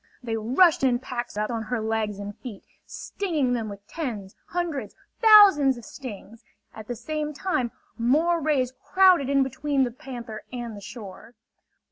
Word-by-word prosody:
They 230 -2 -2
rushed 265 - +3
in 250 -2 +3
packs 245 -3 -6
upon 225 +2 -1
her 235 +2 -3
legs 220 -2 -2
and 205 0 -7
feet, 235 -7 -9 0.2
stinging 310 -11 -2
them 225 -3 -2
with 200 0 -11
tens, 225 - -5
hundreds, 330 -10 -3 0.3
thousands 395 - +7
of 235 - -11
stings. 230 -4 -10 0.3
At 220 -1 -10
the 245 - -4
same 300 +6 -4
time 260 -10 -1 0.3
more 320 +8 +2
rays 270 -4 +1
crowded 370 -8 +4
in 275 -1 +4
between 275 +1 0
the 245 - -1
panther 235 -3 -8
and 240 -3 -5
the 205 - -10
shore. 215 +2 -10
245 Hz, 155 wpm, -25 LUFS, 220-295 Hz, 0.3 s, thousands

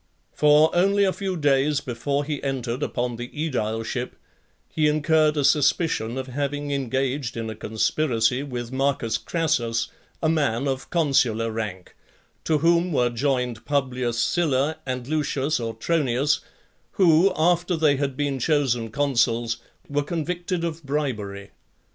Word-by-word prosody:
IX. - - -27
For, 150 +2 +5
only 200 +3 +3
a 190 -1 +2
few 190 -2 -3
days 145 -1 +2
before 140 +2 -2
he 145 -1 -3
entered 130 -2 -3
upon 120 -4 -2
the 120 +1 -5
aedileship, 120 -5 -3 0.6
he 155 -1 +2
incurred 155 0 +2
a 145 - +1
suspicion 140 -4 +2
of 130 - -3
having 145 +2 -3
engaged 135 -1 -1
in 115 -1 -3
a - - -7
conspiracy 115 +2 0
with 125 -4 -5
Marcus 130 -4 0
Crassus, 120 -9 0 0.3
a - - +3
man 145 -5 +1
of 135 -1 -3
consular 125 -9 +2
rank; 105 -5 -5 0.5
to 155 - +2
whom 170 +3 +2
were 125 -5 +2
joined 125 -2 -1
Publius 130 -4 -1
Sylla 150 +2 +1
and 125 -1 -3
Lucius 150 -1 0
Autronius, 135 +3 0 0.5
who, 185 -1 +5
after 175 +2 +2
they 155 -3 +3
had 135 -2 -2
been 145 -2 -1
chosen 125 -5 +1
consuls, 115 -3 +1 0.3
were 145 0 0
convicted 175 +3 -3
of 165 -1 -3
bribery. 110 -9 -3
140 Hz, 135 wpm, -24 LUFS, 120-155 Hz, 0.6 s, For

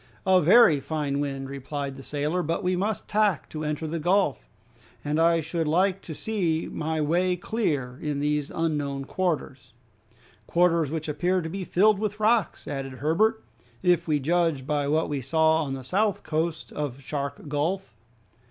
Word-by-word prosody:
"A 185 -1 +5
very 175 -3 +6
fine 145 0 -2
wind," 135 -2 -3
replied 140 0 -5
the 135 - -10
sailor; 150 +6 -1
"but 165 +4 -2
we 180 0 +1
must 200 +3 -2
tack 205 -7 +1
to 155 0 -5
enter 150 +1 -2
the 165 +2 -3
gulf, 175 - +1 0.6
and 150 +2 0
I 165 0 +4
should 160 +1 -2
like 185 +4 +2
to 160 - -8
see 175 -7 -1
my 160 0 -2
way 175 +4 +2
clear 150 - -2
in 150 -2 -2
these 150 0 0
unknown 145 -4 -2
quarters." 155 -9 -3 0.7
"Quarters 170 -3 +3
which 160 0 -4
appear 175 +5 +1
to 160 - -4
be 190 +3 -4
filled 200 +3 +3
with 210 0 -3
rocks," 215 -1 +1
added 135 -2 -4
Herbert, 165 - +1 0.4
"if 175 -2 +3
we 150 -2 +2
judge 165 -2 +1
by 145 -1 0
what 155 +2 +1
we 145 -2 -2
saw 160 +4 +3
on 135 -2 -3
the 130 - -7
south 200 - 0
coast 160 +1 -2
of 145 -3 -4
Shark 140 +2 -5
Gulf." 160 +7 -2
160 Hz, 170 wpm, -26 LUFS, 145-180 Hz, 0.7 s, very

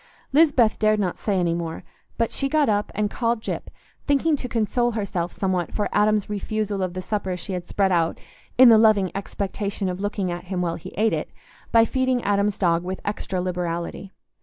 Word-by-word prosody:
Lisbeth 275 -8 +4
dared 215 0 +3
not 185 -4 -1
say 200 -3 0
any 170 -2 +1
more; 170 -1 -4 0.3
but 230 -1 0
she 275 - -1
got 300 -1 +3
up 205 -1 0
and 210 0 0
called 235 -1 0
Gyp, - - -4 0.4
thinking 290 +2 +3
to 255 - -5
console 240 +2 0
herself 185 -5 -2
somewhat 185 -3 -1
for 210 - 0
Adam's 210 0 +2
refusal 210 -1 -2
of 185 -1 -2
the 185 - -4
supper 190 -3 -2
she 190 +2 -6
had 180 -1 -4
spread 195 -1 +1
out 165 -2 +1 0.4
in 255 -1 +9
the 225 -1 +7
loving 215 -4 +4
expectation 200 0 -3
of 180 0 -4
looking 200 -3 -2
at 175 +1 -6
him 185 0 -3
while 175 -2 0
he - - -9
ate 220 +1 +2
it, - - -2 0.4
by 230 -1 +6
feeding 260 0 0
Adam's 200 0 +1
dog 170 -2 +2
with 185 +1 -4
extra 200 -2 -3
liberality. 180 +1 -3
205 Hz, 195 wpm, -23 LUFS, 180-220 Hz, 0.4 s, in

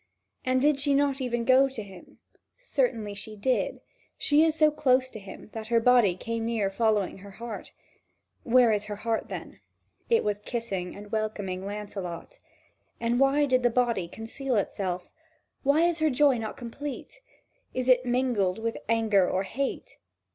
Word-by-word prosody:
And 255 0 +2
did 290 +1 +3
she 280 0 +2
not 280 -1 +1
even 240 -2 -1
go 265 +2 +5
to 240 -5 -6
him? 190 -3 -14 0.4
Certainly - - -1
she 210 +2 -6
did; 250 +5 -1 0.4
she 295 +1 +4
is 320 -1 +2
so 310 -1 +4
close 260 -3 +2
to 220 - -8
him 195 +2 -11
that 220 -1 -6
her 235 0 +3
body 230 -6 +4
came 230 +4 -4
near 225 -4 0
following 210 -2 +1
her 200 +2 -11
heart. 230 -2 -7 0.7
Where 245 -1 +5
is 210 -1 0
her 210 -1 -5
heart, 225 +2 -2
then? - - -7 0.5
It 460 -1 +4
was 205 -1 -1
kissing 200 -7 -3
and 205 0 -11
welcoming 205 -4 -3
Lancelot. 205 - -6 0.6
And 235 +1 0
why 275 +2 +4
did 255 -2 +2
the 245 - +3
body 235 -7 +1
conceal 245 +7 -4
itself? 185 -3 -2 0.5
Why 285 +4 +3
is 340 -2 -2
not 315 - +4
her 280 - 0
joy 275 -3 +4
complete? 280 - -7 0.5
Is 255 0 -1
it 255 -1 +5
mingled 245 -7 +1
with 225 +1 -3
anger 220 -5 +3
or 190 - 0
hate? 265 +8 -4
230 Hz, 165 wpm, -27 LUFS, 205-265 Hz, 0.7 s, go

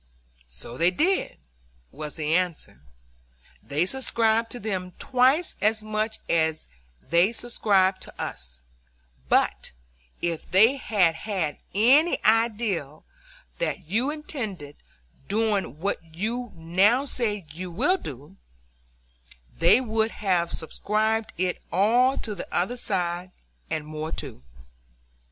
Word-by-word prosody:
"So 65 - -8
they 170 - +5
did," 335 - 0 0.5
was 150 0 -7
the 155 -1 -1
answer; 170 - -1 0.8
"they 150 +5 0
subscribed 230 -1 +2
to 245 - -5
them 185 -4 -3
twice 265 +6 +2
as 215 +1 +2
much 215 +1 -2
as 160 -1 +1 0.4
they 170 +5 +3
subscribed 200 -5 +1
to - - -11
us, 60 0 -6 0.7
but - - +1 0.5
if 170 -2 -3
they 225 +9 +5
had 200 -9 +2
had 165 -4 -3 0.2
any 270 +11 +5
idea 215 -9 +1 0.6
that 210 - -2
you 235 +8 +1
intended 220 - -5 0.5
doing 205 - 0
what 190 -1 -2
you 230 +5 -3
now 190 +11 +3
say 210 - -1
you 180 +3 -6
will 275 - +2
do, 150 - -10 1.2
they 170 +8 +5
would 220 -3 0
have 180 -4 0
subscribed 215 +6 -1
it 180 0 -1
all 240 +8 +3
to 215 - -4
the 195 - -8
other 190 +8 0
side, 180 -5 -2 0.4
and 155 -2 -2
more 155 +1 -5
too." - - -5
200 Hz, 115 wpm, -25 LUFS, 170-230 Hz, 1.2 s, they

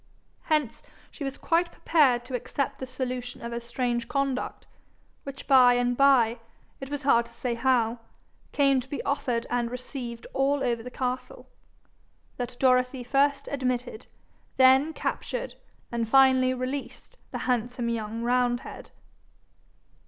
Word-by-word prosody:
Hence 300 -7 0 0.3
she 295 - -8
was 270 0 -4
quite 340 +1 +1
prepared 260 -7 +2
to 260 - -9
accept 275 +2 -3
the 260 - -5
solution 255 -1 -4
of 235 - -5
her 235 - -3
strange 235 0 -2
conduct, 275 -1 -2 0.6
which 275 0 -8
by 255 -3 +6
and 245 0 +1
by, 245 -4 +4 0.4
it 270 - -7
was 290 0 -4
hard 235 -4 +3
to - - -18
say 240 +1 -3
how, 235 -1 +1 0.5
came 275 -2 +3
to 255 +1 -8
be 285 - -4
offered 255 -5 -1
and 240 -1 0
received 245 -1 -7
all 275 +1 +1
over 235 -2 0
the 250 - -8
castle 255 0 -5 0.9
that 245 0 -5
Dorothy 255 0 +2
first 280 +2 +1
admitted, 250 -3 -3 0.5
then 265 +4 +6
captured, - - -4 0.4
and 230 -2 -2
finally 260 0 +5
released 265 - -6
the - - -5
handsome 245 -1 -1
young 225 0 -3
roundhead. 245 0 -1
255 Hz, 135 wpm, -27 LUFS, 240-275 Hz, 0.9 s, by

